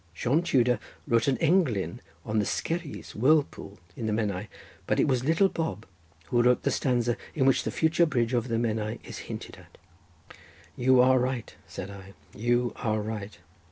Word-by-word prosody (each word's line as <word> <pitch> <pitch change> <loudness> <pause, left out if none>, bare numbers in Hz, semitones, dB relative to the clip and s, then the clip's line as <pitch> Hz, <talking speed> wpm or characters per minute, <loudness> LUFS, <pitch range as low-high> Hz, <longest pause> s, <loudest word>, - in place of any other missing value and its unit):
Sion 125 - +1
Tudor 125 -9 +2 0.3
wrote 115 +2 +2
an 135 - +2
englyn 150 - +1 0.3
on 110 0 0
the 105 - +1
Skerries 165 -3 -3
whirlpool 135 -4 +1 0.2
in 115 - -4
the - - 0
Menai; 105 -2 -1 0.4
but - - +1
it - - +3
was 130 -3 +1
Little 165 +7 +4
Bob 160 - -4 0.4
who 120 - +3
wrote 125 +1 +3
the - - +1
stanza 120 -2 +1 0.2
in 135 - +2
which 135 - +4
the - - -2
future 165 +1 +2
bridge 120 -4 0
over 120 0 +1
the 115 -2 0
Menai 110 -1 -1
is - - -8
hinted - - -7
at." - - -18 1.0
"You 130 0 +4
are 130 +1 +5
right," 125 -2 -3
said 100 - -7
I, 100 0 -12 0.2
"you 120 +1 0
are 110 -2 0
right. 105 -1 -5
120 Hz, 175 wpm, -27 LUFS, 110-135 Hz, 1.0 s, are